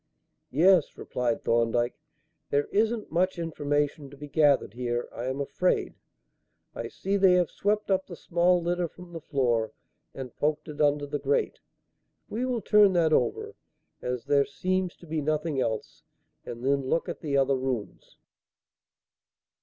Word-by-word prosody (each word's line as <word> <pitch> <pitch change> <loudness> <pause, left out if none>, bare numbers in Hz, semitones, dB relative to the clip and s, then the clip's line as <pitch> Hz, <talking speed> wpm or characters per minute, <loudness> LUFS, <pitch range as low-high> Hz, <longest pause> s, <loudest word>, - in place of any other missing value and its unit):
"Yes," 170 +3 +4
replied 120 -2 -2
Thorndyke; 120 +1 +1 0.6
"there 145 0 +2
isn't 220 +1 0
much 185 +3 +1
information 145 -3 -1
to 140 - -14
be 145 +1 -8
gathered 145 -7 +3
here, 120 0 -2
I 120 - -5
am 130 +2 -2
afraid. 180 +6 0 0.8
I - - -5
see 200 +1 -2
they 190 -2 +5
have 180 -2 +2
swept 210 0 0
up 190 0 +1
the 175 - -8
small 175 +1 +2
litter 175 0 0
from 180 +1 -14
the 165 - -6
floor 120 -7 0 0.4
and 130 -3 -7
poked 150 +1 -1
it 150 -1 -5
under 145 0 +2
the 145 0 -3
grate. 460 0 0 0.7
We 245 +4 -2
will 245 -3 -1
turn 205 -1 +5
that 165 -3 +3
over, 430 - 0 0.5
as 125 -1 -3
there 140 -1 +4
seems 185 +5 -2
to - - -16
be 155 -1 -2
nothing 155 -1 -1
else, 110 -3 -3 0.5
and 120 +2 -6
then 140 -1 +1
look 165 - 0
at - - -5
the 145 -3 -1
other 135 0 +3
rooms." 130 -5 -4
150 Hz, 155 wpm, -27 LUFS, 135-180 Hz, 0.8 s, they